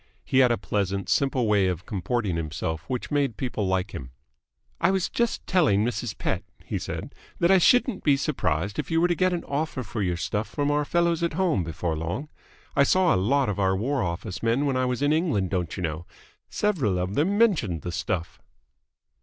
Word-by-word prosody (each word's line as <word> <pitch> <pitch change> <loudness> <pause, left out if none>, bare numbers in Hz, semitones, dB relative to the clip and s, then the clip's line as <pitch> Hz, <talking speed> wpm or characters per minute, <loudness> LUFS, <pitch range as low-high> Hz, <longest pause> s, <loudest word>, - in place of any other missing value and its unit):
He 130 - +2
had 125 -2 +5
a 120 - +2
pleasant, 100 -2 -2
simple 135 -3 +2
way 100 -3 +3
of 90 -1 -3
comporting 100 -1 -1
himself 80 0 -3
which 125 +2 -3
made 140 -7 0
people 115 -6 -2
like 95 +1 0
him. 65 -2 -6 0.7
"I 170 - +3
was 190 -1 +1
just 235 -1 -1
telling 140 - +3
Mrs. 120 -3 -3
Pett," - - -1 0.2
he - - -3
said, - - -6 0.2
"that 170 +2 +3
I 190 - +6
shouldn't 245 +2 +3
be 145 -2 +4
surprised 100 - -1
if - - -3
you 165 -1 +2
were 175 - +4
to 175 - +2
get 185 +2 +2
an 175 -1 -2
offer 140 -2 -2
for 110 - -5
your 90 -3 0
stuff 105 +5 -2
from 145 0 0
our 145 0 +1
fellows 170 +1 +1
at 170 -1 0
home 170 - +1
before 80 0 -3
long. 85 - -4 0.5
I - - +4
saw 180 +4 +4
a - - +2
lot 130 +8 +2
of 105 -1 -2
our 95 -1 +2
War 130 +6 0
Office 90 +1 -4
men 115 +5 +1
when 135 -2 0
I 130 0 +1
was 125 +2 -1
in 145 +1 +3
England, 145 - 0
don't 90 -2 -2
you 90 - -3
know. 80 +1 -3 0.4
Several 145 - 0
of 90 +2 -2
them 175 - +1
mentioned 155 - +2
the 90 - -3
stuff." 85 -1 -3
120 Hz, 210 wpm, -26 LUFS, 95-155 Hz, 0.7 s, I